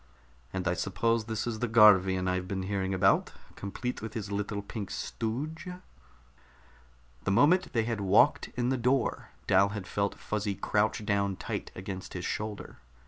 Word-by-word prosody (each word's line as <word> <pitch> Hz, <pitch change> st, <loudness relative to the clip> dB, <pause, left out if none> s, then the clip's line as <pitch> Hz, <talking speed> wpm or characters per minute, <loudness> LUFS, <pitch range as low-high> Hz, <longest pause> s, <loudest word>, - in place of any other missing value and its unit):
"And 95 Hz, -1 st, -3 dB
I 90 Hz, -, +2 dB
suppose 110 Hz, +5 st, 0 dB
this 110 Hz, -1 st, -3 dB
is 115 Hz, -2 st, -3 dB
the 125 Hz, -, 0 dB
Garvian 95 Hz, -4 st, +6 dB
I've 90 Hz, 0 st, -1 dB
been 95 Hz, -1 st, -3 dB
hearing 95 Hz, -1 st, -2 dB
about, 95 Hz, -1 st, +3 dB, 0.2 s
complete 120 Hz, +5 st, -4 dB
with 110 Hz, +3 st, -7 dB
his 105 Hz, -3 st, -4 dB
little 100 Hz, 0 st, -2 dB
pink 100 Hz, -1 st, -6 dB
stooge." 135 Hz, +10 st, -4 dB, 1.6 s
The -, -, 0 dB
moment 160 Hz, -, +4 dB
they 115 Hz, -2 st, +2 dB
had 115 Hz, -2 st, -2 dB
walked 100 Hz, +2 st, +4 dB
in 125 Hz, 0 st, 0 dB
the 130 Hz, -, +1 dB
door, 125 Hz, +1 st, 0 dB, 0.2 s
Dal 95 Hz, +1 st, +4 dB
had 100 Hz, -2 st, -5 dB
felt 100 Hz, +2 st, -1 dB
Fuzzy 105 Hz, -2 st, -2 dB
crouch 105 Hz, +2 st, 0 dB
down 100 Hz, -1 st, +1 dB
tight -, -, -5 dB
against 95 Hz, 0 st, -6 dB
his 90 Hz, -1 st, -4 dB
shoulder. 105 Hz, -1 st, -4 dB
105 Hz, 160 wpm, -29 LUFS, 95-115 Hz, 1.6 s, Garvian